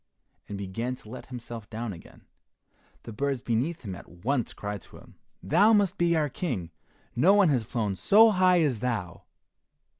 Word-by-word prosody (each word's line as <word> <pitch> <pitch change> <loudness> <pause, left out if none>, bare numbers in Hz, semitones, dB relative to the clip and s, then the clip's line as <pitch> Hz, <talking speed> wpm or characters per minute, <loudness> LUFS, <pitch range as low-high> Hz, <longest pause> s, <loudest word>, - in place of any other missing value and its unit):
and 100 - -5
began 115 +6 -4
to 120 - -18
let 125 +4 -9
himself 120 -4 -8
down 115 -1 -4
again. 85 - -15 0.8
The 115 - -8
birds 140 +2 -1
beneath 125 +8 -2
him 100 -4 -5
at 90 - -11
once 120 +9 -2
cried 105 -2 -6
to - - -15
him. - - -16 0.3
"Thou 205 - +4
must 205 -3 +2
be 170 -1 +3
our 155 -2 +2
King, 120 - -4 0.4
no 175 +11 +5
one 200 -5 +5
has 130 -6 +1
flown 105 -4 -2
so 215 - +6
high 185 -2 +4
as 135 -8 +1
thou." 110 -8 -3
125 Hz, 175 wpm, -27 LUFS, 105-170 Hz, 0.8 s, so